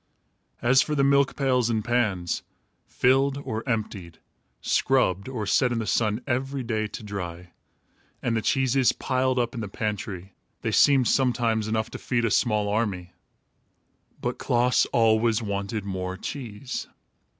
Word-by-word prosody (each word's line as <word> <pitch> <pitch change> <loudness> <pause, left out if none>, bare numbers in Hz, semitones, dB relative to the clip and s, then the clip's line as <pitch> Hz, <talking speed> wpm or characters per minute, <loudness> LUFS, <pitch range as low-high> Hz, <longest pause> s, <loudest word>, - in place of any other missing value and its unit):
As 130 +3 +5
for 150 - -1
the 140 - +2
milk 140 0 +3
pails 125 -4 +1
and 110 -2 -1
pans, 105 -8 0 0.5
filled 135 +2 +2
or 110 -6 -4
emptied, 105 -7 -3 0.4
scrubbed 125 -6 +1
or 120 -5 -3
set 125 +5 +2
in 120 - -1
the 115 - -2
sun 105 +3 0
every 135 +1 -2
day 110 -2 -1
to 105 - -8
dry, 90 -4 -6 0.7
and 120 -2 -1
the 110 - 0
cheeses, 130 0 +2
piled 130 0 0
up 120 -1 0
in 120 - -4
the 110 - -4
pantry, 100 -3 -4 0.3
they - - 0
seemed 135 -4 +5
sometimes 120 -4 +1
enough 110 0 -1
to - - -7
feed 120 -2 0
a 115 - 0
small 105 -2 +2
army. 100 -4 -2 1.1
But - - -3
Klaas 125 +1 +2
always 115 0 +3
wanted 100 +1 -3
more 95 -1 -4
cheese. 125 +1 -6
115 Hz, 150 wpm, -25 LUFS, 105-130 Hz, 1.1 s, As